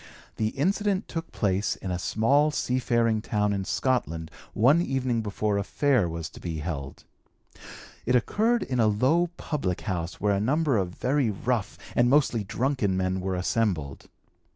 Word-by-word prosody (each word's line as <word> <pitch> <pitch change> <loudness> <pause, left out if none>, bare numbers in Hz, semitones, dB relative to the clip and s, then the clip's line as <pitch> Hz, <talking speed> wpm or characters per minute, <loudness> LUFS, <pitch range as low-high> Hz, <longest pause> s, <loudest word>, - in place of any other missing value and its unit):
The 110 - +1
incident 195 +5 +1
took 165 -1 -5
place 100 -1 0
in 95 - -5
a 90 - -2
small 140 +11 +2
seafaring 120 -5 +1
town 105 -2 0
in 95 -1 -2
Scotland 85 - -1 0.2
one 140 +10 +4
evening 130 -6 0
before 105 -1 -1
a - - -1
Fair 125 - +1
was 80 -1 -4
to - - -12
be 85 -2 -4
held. 75 -4 -5 1.0
It 125 - +3
occurred 220 - +2
in 125 -2 -2
a 110 - +4
low 135 +12 +2
public 115 - -2
house 90 -5 -4
where 105 0 +2
a 100 - +1
number 145 +4 +2
of 95 -4 +1
very 135 -1 +1
rough 110 +2 -2 0.2
and 120 0 +4
mostly 130 -5 +3
drunken 115 -3 0
men 95 0 -1
were 95 0 -2
assembled. 90 -7 -1
110 Hz, 160 wpm, -26 LUFS, 95-135 Hz, 1.0 s, one